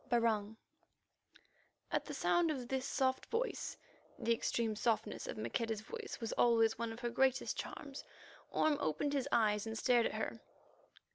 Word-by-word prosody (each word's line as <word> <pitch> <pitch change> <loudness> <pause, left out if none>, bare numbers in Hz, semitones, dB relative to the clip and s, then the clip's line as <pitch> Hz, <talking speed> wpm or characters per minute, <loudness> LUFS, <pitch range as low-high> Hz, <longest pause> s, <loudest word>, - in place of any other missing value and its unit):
BARUNG 220 -3 +2 1.3
At - - 0
the - - -5
sound 345 -1 +3
of 260 -6 -2
this 265 0 -1
soft 260 -1 +1
voice 480 +2 -2 0.4
(the 235 - +2
extreme 225 -1 0
softness 225 - 0
of - - -4
Maqueda's 225 -3 -1
voice 445 - -6
was 230 -1 -3
always 225 -2 +4
one 230 -1 -1
of 225 +2 -8
her 240 -1 -1
greatest 265 +1 +2
charms), 280 -1 -6 0.5
Orme 310 -2 +2
opened 160 - 0
his 280 -1 0
eyes 210 -1 +3
and 220 0 -3
stared 240 0 +4
at - - -5
her. - - -3
235 Hz, 155 wpm, -36 LUFS, 225-270 Hz, 1.3 s, always